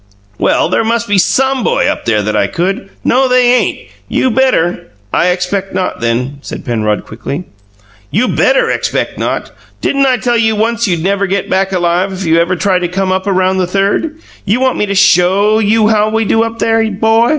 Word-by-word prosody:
"Well, - - +2
there - - 0
must 235 +1 -1
be 205 -2 +2
SOME 265 +6 +1
boy - - +1
up - - -2
there 105 -3 +1
that 105 +1 -2
I 100 - +2
could 190 - -3
" - - -35
"No, 260 +2 +2
they 250 -1 +3
ain't! 250 - -1 0.2
You 260 - +1
better 235 -9 +1
" 100 +1 -34
"I 170 - +2
expect 185 +2 -2
not, 185 -1 -2
then," 125 +4 -2
said - - -8
Penrod, 110 -4 -1
quickly. 135 +9 -6 0.7
"You 245 +5 +1
BETTER - - +2
'expect - - -2
not.' - - -3 0.3
Didn't 275 -1 +1
I 255 -1 +2
tell 240 -1 0
you 220 -1 +2
once 230 +2 0
you'd 170 -4 -1
never 200 +1 0
get 195 0 -2
back 190 +1 +1
alive 180 +1 0
if 190 0 -5
you 165 0 +3
ever 170 +2 +1
tried 185 0 +1
to 180 - -1
come 185 +2 -2
up 190 +1 -1
around 185 -1 +1
the 180 - 0
Third? 200 - -1 0.3
You 210 +5 0
want 260 0 0
me 210 - 0
to 200 - -2
SHOW 195 +4 +3
you 215 0 +2
how 215 -1 +2
we 220 0 0
do 225 - +2
up 230 0 -2
there, 225 -1 +1
'bo?" 225 +3 +2
195 Hz, 210 wpm, -13 LUFS, 180-225 Hz, 0.7 s, they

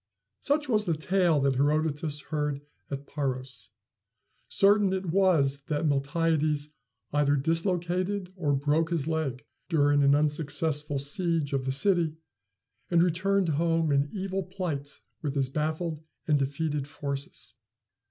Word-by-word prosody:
Such 295 +1 +1
was 215 -4 +2
the 170 - +1
tale 175 -1 +2
that 135 -2 +2
Herodotus 150 +1 0
heard 150 -2 -1 0.3
at 140 0 -5
Paros. 130 -5 -3 0.8
Certain 200 0 +4
it 190 0 -2
was 160 -8 +3
that 150 +1 -1
Miltiades 150 +1 +1 0.4
either 145 -1 +3
dislocated 180 +5 0
or 150 -6 0
broke 150 +4 +1
his 165 -5 -1
leg 150 -4 -2 0.2
during 145 -3 +3
an 140 0 +5
unsuccessful 150 0 0
siege 150 +1 0
of 135 -2 0
the 130 - 0
city, 165 +2 +2 0.7
and 170 -1 +4
returned 185 +2 +1
home 165 +1 +1
in 140 +1 +2
evil 195 -1 -2
plight 175 -7 -5 0.2
with 145 -2 -3
his 135 -2 0
baffled 155 +2 -2 0.3
and 150 -2 +3
defeated 145 +1 -2
forces. 140 -1 -5
155 Hz, 130 wpm, -28 LUFS, 145-175 Hz, 0.8 s, an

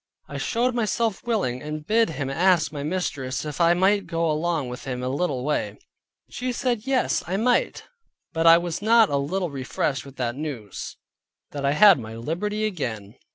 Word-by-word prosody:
I - - -6
showed 250 +2 0
myself 230 -2 -1
willing, 160 - 0
and 150 0 -6
bid 225 +3 +3
him 145 -3 -4
ask 170 +3 +2
my 145 -2 -5
mistress 145 -5 -3
if 150 +3 -4
I 170 +1 +5
might 190 +1 +2
go 165 -2 0
along 155 -2 -1
with 125 +1 -8
him 125 -1 -4
a 125 - -1
little 135 -2 -1
way; 105 -8 -1 0.5
she 250 0 -4
said 245 -2 -2
yes, 270 -2 +1
I 185 +2 -1
might, 245 +4 +1 0.5
but 165 0 +2
I 165 0 +9
was 170 +1 -3
not 225 0 +5
a 140 - +2
little 170 +5 -2
refreshed 135 -1 -2
with 140 -1 -13
that 120 -2 -2
news, 135 -9 -6 0.5
that 140 -1 -2
I 140 - +2
had 200 -1 +7
my 110 -1 -8
liberty 195 - -2
again. 115 - -4
165 Hz, 185 wpm, -24 LUFS, 135-205 Hz, 0.5 s, I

